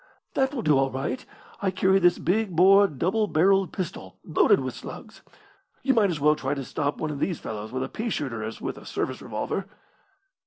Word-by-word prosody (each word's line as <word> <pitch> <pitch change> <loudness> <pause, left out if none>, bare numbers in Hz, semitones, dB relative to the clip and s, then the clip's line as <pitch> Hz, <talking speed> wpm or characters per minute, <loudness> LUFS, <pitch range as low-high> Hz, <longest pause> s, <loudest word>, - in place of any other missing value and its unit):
"That 265 0 +1
will 255 -6 -4
do 150 -5 +4
all 135 0 +2
right. 130 -1 -3 0.4
I 195 - +1
carry 190 +1 +3
this 175 -1 +4
big 195 0 0
bore 195 +4 +7
double 190 - 0
barrelled 195 +2 +3
pistol 185 -2 -6
loaded - - +4
with - - -3
slugs. - - -10 0.6
You 270 0 +3
might 215 -5 +3
as 165 -4 -2
well 150 +1 +4
try 145 - -2
to 135 -2 -5
stop 145 +2 -2
one 155 - -2
of 145 - -5
these 175 0 -1
fellows 110 0 -6
with 130 +1 -2
a - - -3
pea 225 - -4
shooter 120 - -3
as 110 +1 -6
with - - -5
a - - -15
service - - -3
revolver." - - -3
175 Hz, 205 wpm, -26 LUFS, 140-195 Hz, 0.6 s, bore